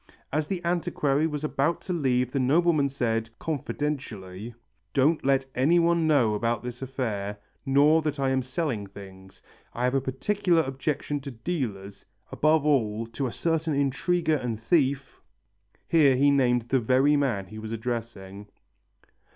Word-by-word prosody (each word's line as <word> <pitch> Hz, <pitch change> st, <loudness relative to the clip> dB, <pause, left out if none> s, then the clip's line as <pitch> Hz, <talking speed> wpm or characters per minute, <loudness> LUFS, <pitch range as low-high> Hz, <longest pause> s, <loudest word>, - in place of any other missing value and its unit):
As 150 Hz, 0 st, 0 dB
the 175 Hz, -1 st, -4 dB
antiquary 155 Hz, -4 st, +1 dB
was 150 Hz, -1 st, -4 dB
about 155 Hz, +3 st, 0 dB
to 180 Hz, -, -4 dB
leave 125 Hz, -6 st, +1 dB
the 140 Hz, -, -1 dB
nobleman 150 Hz, +2 st, +3 dB
said, 115 Hz, -4 st, -1 dB
confidentially, 120 Hz, -, -4 dB, 0.4 s
"Don't 150 Hz, +4 st, +3 dB
let 135 Hz, 0 st, +2 dB
anyone 170 Hz, +4 st, +3 dB
know 130 Hz, -8 st, +3 dB
about 115 Hz, +1 st, -1 dB
this 125 Hz, +1 st, -7 dB
affair, 110 Hz, -6 st, -3 dB, 0.3 s
nor 145 Hz, +4 st, +5 dB
that 150 Hz, -2 st, -3 dB
I 135 Hz, -1 st, +1 dB
am 130 Hz, 0 st, +1 dB
selling 130 Hz, -5 st, -3 dB
things. 95 Hz, -1 st, -13 dB, 0.3 s
I 120 Hz, -, -3 dB
have 125 Hz, +1 st, +1 dB
a 135 Hz, -, +2 dB
particular 170 Hz, +6 st, +1 dB
objection 145 Hz, +2 st, -3 dB
to 140 Hz, 0 st, -7 dB
dealers, 115 Hz, -, -5 dB, 0.3 s
above 155 Hz, 0 st, +2 dB
all 115 Hz, -7 st, +1 dB
to 120 Hz, +4 st, -3 dB
a -, -, -4 dB
certain 160 Hz, 0 st, -1 dB
intriguer 155 Hz, +4 st, +1 dB
and 120 Hz, -5 st, -4 dB
thief 135 Hz, +1 st, 0 dB, 0.3 s
" -, -, -47 dB, 0.3 s
Here 145 Hz, -5 st, +4 dB
he 140 Hz, +2 st, +4 dB
named 125 Hz, -3 st, +2 dB
the 135 Hz, -, +3 dB
very 130 Hz, +5 st, +3 dB
man 130 Hz, -9 st, 0 dB
he 110 Hz, +3 st, -10 dB
was 110 Hz, 0 st, -7 dB
addressing. 110 Hz, -4 st, -5 dB
135 Hz, 150 wpm, -26 LUFS, 115-150 Hz, 0.4 s, nor